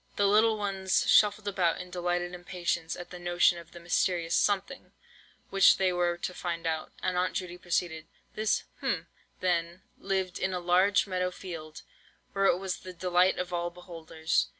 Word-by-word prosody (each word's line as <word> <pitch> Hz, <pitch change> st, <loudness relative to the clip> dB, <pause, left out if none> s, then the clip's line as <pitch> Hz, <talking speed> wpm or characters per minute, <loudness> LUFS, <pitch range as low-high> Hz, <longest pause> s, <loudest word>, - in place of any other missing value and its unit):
The 205 Hz, -, +2 dB
little 215 Hz, +2 st, +4 dB
ones 195 Hz, -2 st, 0 dB
shuffled 205 Hz, 0 st, +4 dB
about 185 Hz, -4 st, +1 dB
in 180 Hz, 0 st, -8 dB
delighted 175 Hz, 0 st, -1 dB
impatience 175 Hz, -2 st, -3 dB
at 175 Hz, -, -9 dB
the 180 Hz, -, -8 dB
notion 175 Hz, 0 st, +3 dB
of 170 Hz, -1 st, -14 dB
the 175 Hz, -, -11 dB
mysterious 170 Hz, 0 st, 0 dB
"something" 205 Hz, +6 st, 0 dB, 0.6 s
which 195 Hz, 0 st, +6 dB
they 185 Hz, -1 st, +2 dB
were 175 Hz, -1 st, +1 dB
to 180 Hz, -, -4 dB
find 170 Hz, -2 st, -4 dB
out, 160 Hz, -1 st, -2 dB
and 185 Hz, -, 0 dB
Aunt 180 Hz, +1 st, 0 dB
Judy 180 Hz, -1 st, -4 dB
proceeded:— 170 Hz, -2 st, -2 dB, 0.3 s
"This—hm—then, 180 Hz, -, -2 dB, 0.2 s
lived 190 Hz, -2 st, -2 dB
in 190 Hz, -, -1 dB
a 180 Hz, -, -1 dB
large 185 Hz, +3 st, +3 dB
meadow 180 Hz, -1 st, -1 dB
field, 165 Hz, -4 st, -8 dB, 0.5 s
where 195 Hz, 0 st, +1 dB
it 175 Hz, -, +4 dB
was 190 Hz, -1 st, -3 dB
the 185 Hz, -, -10 dB
delight 180 Hz, +1 st, +2 dB
of 180 Hz, 0 st, -4 dB
all 175 Hz, 0 st, -1 dB
beholders. 165 Hz, -2 st, -2 dB
180 Hz, 165 wpm, -29 LUFS, 175-190 Hz, 0.6 s, which